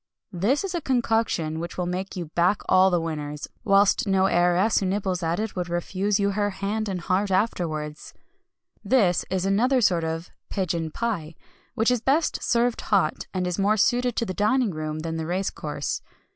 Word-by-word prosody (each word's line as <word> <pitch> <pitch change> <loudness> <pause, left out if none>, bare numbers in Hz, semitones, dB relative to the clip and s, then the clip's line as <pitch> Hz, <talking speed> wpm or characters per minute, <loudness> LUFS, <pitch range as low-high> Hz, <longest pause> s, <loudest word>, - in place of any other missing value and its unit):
This 210 - +1
is 390 -2 -3
a 345 - -2
concoction 225 - 0
which 170 +1 -6
will 180 - -1
make 185 +2 -4
you 175 -2 -4
back 180 +4 +2
all 185 +1 +5
the 175 -2 +2
winners; 150 -3 -4 0.2
whilst 200 +1 +3
no 190 -1 +3
heiress 180 +3 +3
who 195 - -1
nibbles 190 -2 -1
at 165 +2 -1
it 220 -1 -3
would 180 -1 -3
refuse 190 +4 -1
you 200 0 +2
her 205 +1 0
hand 205 +2 -3
and 185 -2 -3
heart 190 +4 0
afterwards. 160 -7 -2 0.7
This 200 -6 +2
is 190 0 -1
another 240 +7 +3
sort 180 -7 +2
of 160 +1 -4 0.2
Pigeon 170 -4 -2
Pie 170 -6 -3 0.4
which 225 +1 +2
is 250 -3 +1
best 290 +6 +1
served 235 0 +1
hot, 190 -7 0
and 185 -1 -2
is 180 +1 -2
more 205 +2 +3
suited 245 +3 +2
to 230 - 0
the 185 - -4
dining 230 +3 +2
room 155 -1 -4
than 165 0 -3
the 160 -1 -3
race 185 +3 -1
course. 145 -2 -4
190 Hz, 185 wpm, -25 LUFS, 170-215 Hz, 0.7 s, all